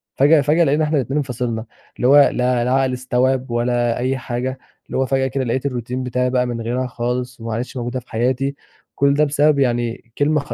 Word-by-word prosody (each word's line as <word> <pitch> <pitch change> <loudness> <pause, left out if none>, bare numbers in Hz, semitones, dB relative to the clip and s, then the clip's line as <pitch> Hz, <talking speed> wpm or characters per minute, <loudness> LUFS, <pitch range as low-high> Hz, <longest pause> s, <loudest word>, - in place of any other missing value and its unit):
فجأة 145 +2 +5
فجأة 155 +4 +3
لقينا 150 +1 +2
إحنا 155 0 +1
الاتنين 135 +2 -1
انفصلنا، 125 -4 -2 0.3
اللي 125 - +1
هو 140 - +6
لا 125 -1 0
لا 125 - 0
عقل 135 -1 +2
استوعب 130 0 0
ولا 120 0 0
أي 130 +2 -1
حاجة، 130 +1 -4 0.3
اللي - - -4
هو 135 - +2
فجأة 135 0 +1
كده 135 0 -2
لقيت 130 +3 -2
الروتين 125 -1 -3
بتاعي 125 0 0
بقى 125 -1 +1
من 120 -1 -4
غيرها 125 +3 -2
خالص، 125 +1 -3
وما 115 -1 -4
عادتش 125 +3 -4
موجودة 120 +1 -3
في 125 - -20
حياتي، 130 +4 0 0.4
كل 140 0 +3
ده 150 +1 +3
بسبب 145 0 +3
يعني 120 -2 -1
كلمة 150 +2 +2
خ 145 - -6
125 Hz, 210 wpm, -20 LUFS, 120-135 Hz, 0.4 s, هو